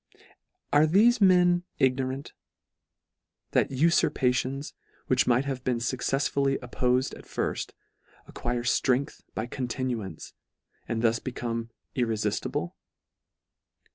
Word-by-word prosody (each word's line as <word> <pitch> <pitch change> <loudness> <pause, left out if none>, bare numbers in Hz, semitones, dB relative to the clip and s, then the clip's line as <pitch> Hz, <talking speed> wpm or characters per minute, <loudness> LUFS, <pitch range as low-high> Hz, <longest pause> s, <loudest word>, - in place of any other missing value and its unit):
Are 150 +2 +6
thefe 215 +8 +4
men 180 -2 +5
ignorant, 130 +1 0 1.2
that - - +2
ufurpations, 135 -2 +1 0.3
which - - +2
might 125 +3 +3
have 135 -2 -3
been 125 -2 0
fuccefsfully 135 +3 0
oppofed 125 +1 0
at - - -13
firft, - - -3 0.5
acquire 120 0 -3
ftrength 130 +3 +1
by 110 - -2
continuance, 120 - -4 0.5
and 115 0 -2
thus 115 0 +3
become 115 -2 -4 0.3
irrefiftible 120 - -1
130 Hz, 95 wpm, -27 LUFS, 120-140 Hz, 1.2 s, Are